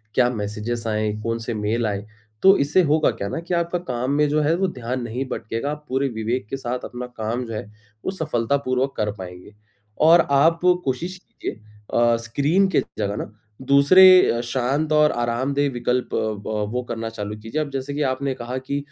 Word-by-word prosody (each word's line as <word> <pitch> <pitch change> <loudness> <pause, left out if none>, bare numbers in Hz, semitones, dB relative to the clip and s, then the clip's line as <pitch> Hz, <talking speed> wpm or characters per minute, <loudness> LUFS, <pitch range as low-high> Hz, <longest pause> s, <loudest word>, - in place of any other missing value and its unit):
क्या 125 -1 +4
मैसेजेस 110 +1 -4
आएँ? 110 -1 0
कौन 115 0 -1
से 115 +1 -4
मेल 110 +2 -1
आए? 100 0 -3 0.4
तो 195 +1 +8
इससे 150 +7 +3
होगा 155 0 +3
क्या 100 - -5
ना - - -3
कि 170 +2 -5
आपका 170 0 0
काम 125 -4 -3
में 150 +1 +3
जो 155 +1 +2
है 155 +3 +2
वो 190 0 +1
ध्यान 125 -4 -4
नहीं 120 +3 -3
भटकेगा 115 +5 -3
आप 150 0 -7
पूरे 135 +2 +1
विवेक 110 0 -3
के 135 - -3
साथ 125 -1 -4
अपना 125 0 -6
काम 115 +3 -2
जो 115 - -7
है 110 - -4 0.4
वो - - 0
सफलतापूर्वक 135 -4 -1
कर 105 -1 0
पाएँगे। 90 +2 -10 0.5
और 165 +2 +6
आप 165 +4 +4 0.3
कोशिश 170 +8 -2
कीजिए - - -7 0.4
अ, 120 0 +4
स्क्रीन 145 +12 +1
के 165 - +3 0.2
जगह 100 -1 -1
न - - -16 0.4
दूसरे 180 -1 +7
शांत 135 +5 -1
और 150 0 +5
आरामदेह 130 +4 0
विकल्प 125 +1 -1
अ, - - +1
व 105 0 -2
वो 125 +1 -1
करना 115 -1 -3
चालू 105 -1 -5
कीजिए। 115 +8 -3
अब 145 - -3
जैसे 135 +1 -4
कि 150 - -2
आपने 135 +1 -2
कहा 125 +1 -5
कि 140 +2 -3
125 Hz, 195 wpm, -22 LUFS, 115-150 Hz, 0.5 s, तो